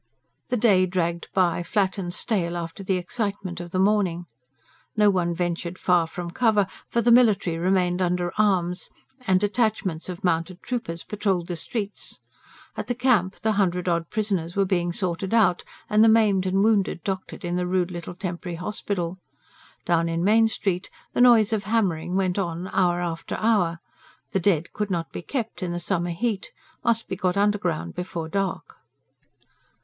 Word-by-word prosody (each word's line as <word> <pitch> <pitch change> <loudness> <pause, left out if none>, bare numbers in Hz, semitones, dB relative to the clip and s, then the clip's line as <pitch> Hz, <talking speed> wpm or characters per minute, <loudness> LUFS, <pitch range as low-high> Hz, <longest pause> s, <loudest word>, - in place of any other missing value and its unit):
The 250 - +1
day 195 -5 +4
dragged 170 -2 -2
by, 175 -3 +2
flat 190 +2 0
and 175 -2 -3
stale 175 -4 -1
after 170 +3 -6
the 190 -1 +1
excitement 195 -2 -3
of 175 0 -7
the 185 - -3
morning. 190 -3 +2 0.7
No 210 -1 +5
one 175 -2 0
ventured 175 +1 -2
far 175 -3 +2
from 170 +1 -6
cover; 215 -1 +3 0.2
for 235 - +1
the 240 - +4
military 215 -8 +4
remained 180 0 +1
under 175 -1 0
arms, 185 -4 +1 0.4
and 185 -1 +4
detachments 205 -5 0
of 180 -1 -7
mounted 175 +1 -1
troopers 230 -10 -4
patrolled 195 -5 -1
the 175 - -2
streets. 205 +4 -5 0.6
At - - -5
the 245 - -1
Camp 230 -7 +2
the 220 - +2
hundred 185 -3 0
odd 170 -1 0
prisoners 195 -6 -2
were 200 -1 +3
being 175 -2 0
sorted 185 +3 -1
out, 185 -6 +3 0.2
and 215 0 +4
the 225 - +7
maimed 210 -4 +4
and 195 +1 +2
wounded 205 -6 +2
doctored 190 -1 -4
in 175 0 -1
the 180 0 -1
rude 180 0 0
little 175 0 -6
temporary 175 -2 -5
hospital. 180 -1 -3 0.7
Down 170 -1 +2
in 165 +1 -1
Main 220 +3 +5
Street 195 -4 -1 0.2
the - - +1
noise 230 -3 +6
of 205 -2 -1
hammering 185 -6 0
went 190 0 +1
on 175 0 -3
hour 175 -2 +2
after 165 -2 -4
hour. 205 -7 +2 0.5
The 195 - +1
dead 170 -3 +1
could 210 -1 -2
not 170 -3 -2
be - - -6
kept, 230 +1 -4
in 180 -2 -2
the 175 - -3
summer 175 0 -1
heat, 200 +3 -2 0.3
must 230 -1 +2
be - - -3
got 185 0 0
underground 200 - 0
before 175 -3 -4
dark. 195 +3 -3
185 Hz, 170 wpm, -25 LUFS, 175-210 Hz, 0.7 s, the